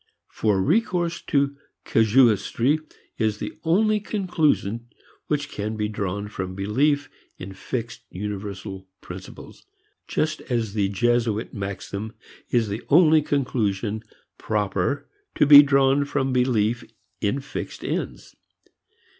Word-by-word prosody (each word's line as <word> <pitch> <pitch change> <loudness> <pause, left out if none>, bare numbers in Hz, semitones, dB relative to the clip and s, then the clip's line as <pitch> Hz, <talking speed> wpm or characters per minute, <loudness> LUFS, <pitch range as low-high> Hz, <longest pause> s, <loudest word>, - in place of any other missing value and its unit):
For 105 -3 +1
recourse 175 - +1
to 140 -1 +1 0.3
casuistry 115 +4 +3 0.4
is 110 -2 +1
the - - -6
only 210 +6 +3
conclusion 160 - 0 0.4
which 145 -1 -1
can 110 +2 -4
be 105 -1 0
drawn 100 -1 -3
from 95 -3 -5
belief 140 +9 +1 0.3
in 95 +2 -8
fixed 115 +3 -5
universal 100 -1 -6
principles, 90 +1 -10 0.4
just 155 0 -1
as 115 -5 -1
the 100 -3 +1
Jesuit 115 +1 0
maxim 100 +1 -5 0.4
is 120 -3 +2
the 105 +2 -4
only 160 0 +6
conclusion 110 -7 -1 0.4
proper 105 +4 -1 0.3
to - - +4
be 145 0 +11
drawn 140 0 +3
from 135 -2 -1
belief 120 -2 +1 0.4
in 105 +6 0
fixed 140 +1 -7
ends. - - -4
115 Hz, 115 wpm, -24 LUFS, 100-145 Hz, 0.4 s, be